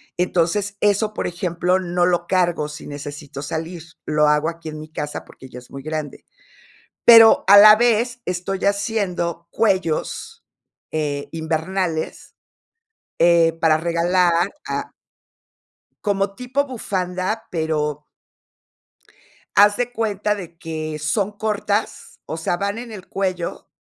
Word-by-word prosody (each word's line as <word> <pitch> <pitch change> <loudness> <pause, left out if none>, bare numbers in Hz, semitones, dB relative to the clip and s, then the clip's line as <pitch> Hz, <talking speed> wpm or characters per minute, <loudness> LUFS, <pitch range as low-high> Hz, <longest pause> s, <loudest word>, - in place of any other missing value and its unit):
Entonces, 180 +3 0
eso, 210 +1 +1
por - - -2
ejemplo, 175 +1 0
no 175 -1 0
lo 175 -1 +1
cargo 175 -5 +1
si 150 0 -9
necesito 145 -1 -8
salir, 160 +2 -5 0.2
lo 150 0 +2
hago 150 +2 +2
aquí 165 -1 -8
en 155 0 -7
mi 155 - -9
casa 150 -1 -5
porque 130 - -14
ya 125 - -9
es 125 - -18
muy 135 0 -9
grande. 155 -2 -5 0.8
Pero 230 -1 +8
a 200 - +9
la 210 +1 +10
vez, 240 +1 +1
estoy 180 +2 -3
haciendo 195 -5 -1
cuellos, 190 -7 -1 0.5
eh, 145 -2 -2
invernales, 160 +1 -3 0.8
eh, 170 -1 +5
para 160 -1 +4
regalar 170 +2 +2 0.3
a - - -4 1.1
como 195 -1 0
tipo 255 +4 -1
bufanda, 190 -4 -3
pero 150 -3 -2 1.5
haz 205 +1 +6
de 245 0 -1
cuenta 210 -3 -1
de 175 -4 -9
que 155 -2 -5
son 195 +7 0
cortas, 210 0 -2
o 160 - -5
sea, 170 +2 -1
van 200 +3 -2
en 235 0 -7
el 195 -4 -10
cuello, 185 -3 -3
175 Hz, 130 wpm, -21 LUFS, 160-205 Hz, 1.5 s, la